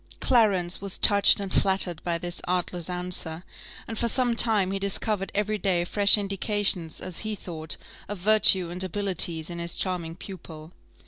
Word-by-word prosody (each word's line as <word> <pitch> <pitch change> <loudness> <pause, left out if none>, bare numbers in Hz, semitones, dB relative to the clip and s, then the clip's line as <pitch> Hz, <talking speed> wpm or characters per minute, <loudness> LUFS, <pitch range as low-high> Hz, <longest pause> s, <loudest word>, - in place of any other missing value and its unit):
Clarence 200 -9 +1
was 200 -1 -6
touched 200 -1 +6
and 195 -2 -6
flattered 190 -4 +1
by 170 -1 -1
this 175 +1 -4
artless 180 -1 -2
answer, 180 -2 -3 0.4
and 225 - -5
for 235 - 0
some 245 0 +1
time 215 -5 +3
he 195 - -3
discovered 200 0 -2
every 210 +1 -1
day 180 -2 0
fresh 200 +4 +4
indications, 195 -4 -1
as 185 -2 -2
he 215 -1 -3
thought, 160 -5 -4 0.3
of 205 - -5
virtue 190 -2 +4
and 180 +1 -3
abilities 180 -4 -2
in 170 - -6
his 170 0 -2
charming 175 -3 -4
pupil. 165 -4 -11
185 Hz, 160 wpm, -25 LUFS, 175-205 Hz, 0.4 s, touched